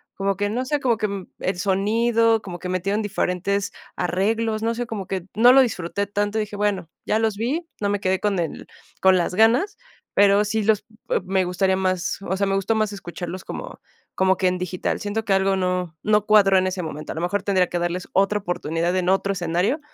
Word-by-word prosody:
como 195 Hz, 0 st, 0 dB
que, 205 Hz, 0 st, 0 dB
no 245 Hz, +4 st, -2 dB
sé, 295 Hz, +3 st, 0 dB
como 245 Hz, -5 st, +1 dB
que 200 Hz, -3 st, -3 dB
el 185 Hz, -1 st, -2 dB
sonido, 225 Hz, +4 st, +2 dB
como 175 Hz, -2 st, -7 dB
que 180 Hz, -, -6 dB
metieron 195 Hz, +4 st, 0 dB
diferentes 200 Hz, 0 st, -1 dB, 0.2 s
arreglos, 215 Hz, +5 st, 0 dB
no 230 Hz, +1 st, +1 dB
sé, 240 Hz, 0 st, -3 dB
como 205 Hz, -4 st, -5 dB
que 190 Hz, -3 st, -3 dB
no 240 Hz, +3 st, +7 dB
lo 270 Hz, -, +8 dB
disfruté 200 Hz, -4 st, -1 dB
tanto. 205 Hz, +1 st, -1 dB
Dije: 210 Hz, -1 st, -4 dB
"Bueno, 200 Hz, -5 st, -1 dB, 0.2 s
ya 215 Hz, -, +1 dB
los 220 Hz, -2 st, +1 dB
vi, 295 Hz, +10 st, -2 dB
no 200 Hz, -, +1 dB
me 205 Hz, 0 st, 0 dB
quedé 185 Hz, -1 st, 0 dB
con 200 Hz, -2 st, 0 dB
el 165 Hz, -2 st, -4 dB, 0.4 s
con 190 Hz, -1 st, +6 dB
las 180 Hz, +1 st, -1 dB
ganas", 245 Hz, -, +3 dB, 0.4 s
pero 200 Hz, 0 st, +5 dB
sí 220 Hz, +1 st, -1 dB
los 215 Hz, -1 st, +2 dB, 0.3 s
e -, -, +2 dB
me 190 Hz, 0 st, +1 dB
gustaría 190 Hz, +1 st, +1 dB
más, 185 Hz, -1 st, -1 dB
o 190 Hz, -, 0 dB
sea, 200 Hz, -, +1 dB
me 195 Hz, -, +1 dB
gustó 195 Hz, +3 st, +1 dB
más 215 Hz, -1 st, +1 dB
escucharlos 175 Hz, -1 st, -7 dB
como -, -, -7 dB, 0.4 s
como 190 Hz, 0 st, +3 dB
que 185 Hz, -, +2 dB
en 180 Hz, 0 st, +1 dB
digital. 180 Hz, 0 st, -2 dB
Siento 215 Hz, +1 st, -3 dB
que 195 Hz, -, +2 dB
algo 195 Hz, 0 st, +2 dB
no 180 Hz, -3 st, -1 dB
no 210 Hz, -1 st, +2 dB
cuadró 205 Hz, -3 st, +5 dB
en 185 Hz, -, +2 dB
ese 185 Hz, -1 st, -2 dB
momento, 155 Hz, -1 st, -6 dB
a -, -, -6 dB
lo 160 Hz, -, -3 dB
mejor 185 Hz, +3 st, -1 dB
tendría 190 Hz, -3 st, +2 dB
que 175 Hz, -, -2 dB
darles 175 Hz, +1 st, -3 dB
otra 195 Hz, +2 st, +2 dB
oportunidad 175 Hz, -2 st, -2 dB
en 180 Hz, 0 st, 0 dB
otro 195 Hz, +1 st, +2 dB
escenario, 180 Hz, -, 0 dB
195 Hz, 215 wpm, -23 LUFS, 185-215 Hz, 0.4 s, lo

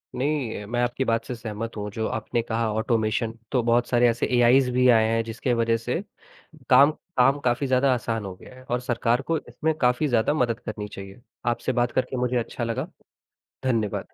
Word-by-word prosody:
नहीं 130 Hz, -5 st, -1 dB
अ, -, -, -9 dB
मैं 120 Hz, +2 st, -1 dB
आपकी 120 Hz, +2 st, -1 dB
बात 115 Hz, -1 st, 0 dB
से 125 Hz, -, -5 dB
सहमत 115 Hz, 0 st, -6 dB
हूँ 105 Hz, 0 st, -4 dB
जो 110 Hz, +2 st, -2 dB
आपने 115 Hz, +2 st, -2 dB
कहा 115 Hz, -1 st, -1 dB
ऑटोमेशन, 110 Hz, 0 st, 0 dB, 0.2 s
तो 125 Hz, -, +2 dB
बहुत 120 Hz, +1 st, +2 dB
सारे 120 Hz, -1 st, +4 dB
ऐसे 115 Hz, -, 0 dB
एआईज़ 125 Hz, +2 st, +5 dB
भी 125 Hz, +1 st, +3 dB
आए 110 Hz, -2 st, +5 dB
हैं 115 Hz, 0 st, +1 dB
जिसके 115 Hz, +2 st, -2 dB
वजह 115 Hz, -1 st, +2 dB
से 120 Hz, +8 st, -3 dB, 0.7 s
काम 140 Hz, +3 st, +7 dB, 0.3 s
काम 135 Hz, +3 st, +4 dB
काफ़ी 125 Hz, +3 st, +1 dB
ज़्यादा 130 Hz, +1 st, +3 dB
आसान 115 Hz, -3 st, -2 dB
हो 95 Hz, -1 st, -6 dB
गया 125 Hz, -, -15 dB
है 130 Hz, -, -14 dB
और 125 Hz, -1 st, -1 dB
सरकार 120 Hz, 0 st, 0 dB
को 165 Hz, -, +3 dB
इसमें 160 Hz, +1 st, -2 dB
काफ़ी 125 Hz, +4 st, +2 dB
ज़्यादा 120 Hz, +1 st, +2 dB
मदद 120 Hz, -5 st, 0 dB
करनी 105 Hz, -3 st, -6 dB
चाहिए। 100 Hz, +2 st, -10 dB, 0.3 s
आपसे 120 Hz, -, 0 dB
बात 120 Hz, 0 st, 0 dB
करके 130 Hz, 0 st, -1 dB
मुझे 125 Hz, 0 st, 0 dB
अच्छा 120 Hz, +1 st, -3 dB
लगा। 120 Hz, +7 st, -2 dB, 0.8 s
धन्यवाद। 115 Hz, -6 st, -1 dB
120 Hz, 200 wpm, -25 LUFS, 115-125 Hz, 0.8 s, काम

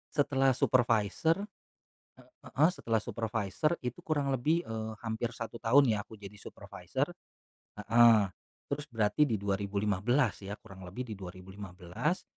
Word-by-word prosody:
Setelah 135 Hz, -2 st, +3 dB
supervisor, 125 Hz, -, +2 dB, 0.7 s
eee, -, -, -20 dB, 0.2 s
heeh, 155 Hz, +5 st, +3 dB
setelah 115 Hz, -, -1 dB
supervisor 110 Hz, -, -1 dB
itu 125 Hz, -1 st, -4 dB
kurang 145 Hz, -3 st, -1 dB
lebih, 155 Hz, +7 st, +1 dB
eee, 110 Hz, -3 st, -5 dB
hampir 115 Hz, +1 st, -3 dB
1 115 Hz, 0 st, -6 dB
tahun 125 Hz, +3 st, +5 dB
ya 105 Hz, -2 st, -1 dB
aku -, -, -12 dB
jadi 105 Hz, -1 st, -11 dB
supervisor, -, -, -4 dB, 0.6 s
heeh, 110 Hz, -1 st, +5 dB, 0.4 s
terus 145 Hz, +1 st, -3 dB
berarti 115 Hz, +3 st, +2 dB
di 115 Hz, -, 0 dB
2015 100 Hz, +4 st, 0 dB
ya 100 Hz, -, -4 dB
kurang 95 Hz, -1 st, -11 dB
lebih 115 Hz, +6 st, -6 dB
di 105 Hz, -, -6 dB
2015 95 Hz, -, -4 dB
115 Hz, 130 wpm, -31 LUFS, 100-135 Hz, 0.7 s, tahun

